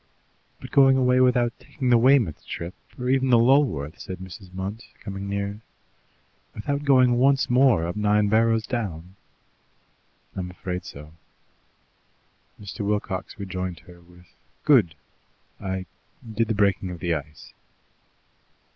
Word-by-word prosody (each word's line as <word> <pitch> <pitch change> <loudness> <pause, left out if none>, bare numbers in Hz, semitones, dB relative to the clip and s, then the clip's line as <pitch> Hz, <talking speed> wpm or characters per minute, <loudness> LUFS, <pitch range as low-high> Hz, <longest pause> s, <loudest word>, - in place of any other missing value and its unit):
"But - - -10
going 135 -1 +6
away 125 -1 +3
without 125 -2 +3
taking 130 -4 -3
the 120 - +7
Weymouth 120 - +3
trip, 85 +2 -6 0.2
or 125 - -4
even 130 0 +2
the 120 - +6
Lulworth?" 115 - +2
said 95 - -7
Mrs. 95 +1 -11
Munt, 95 +4 -5 0.2
coming 100 -1 -6
nearer. 100 +1 -3 1.0
"Without 140 +7 -3
going 130 -3 +4
once 135 0 +3
more 125 -9 +4
up 85 - -4
Nine 105 0 +2
Barrows 110 +1 +2
Down?" 95 -7 -5 1.2
"I'm 90 -2 -4
afraid 90 0 -5
so." 75 +2 -11 1.5
Mr. 100 -2 -9
Wilcox 100 -2 -3
rejoined 95 -3 -5
her 85 -1 -16
with, 90 +1 -19 0.4
"Good! 115 - +4 0.6
I 95 -1 -4 0.4
did 110 0 -1
the 110 - -1
breaking 100 -2 +1
of 90 -2 -7
the 85 -1 -1
ice." 75 +1 -7
105 Hz, 130 wpm, -24 LUFS, 90-125 Hz, 1.5 s, the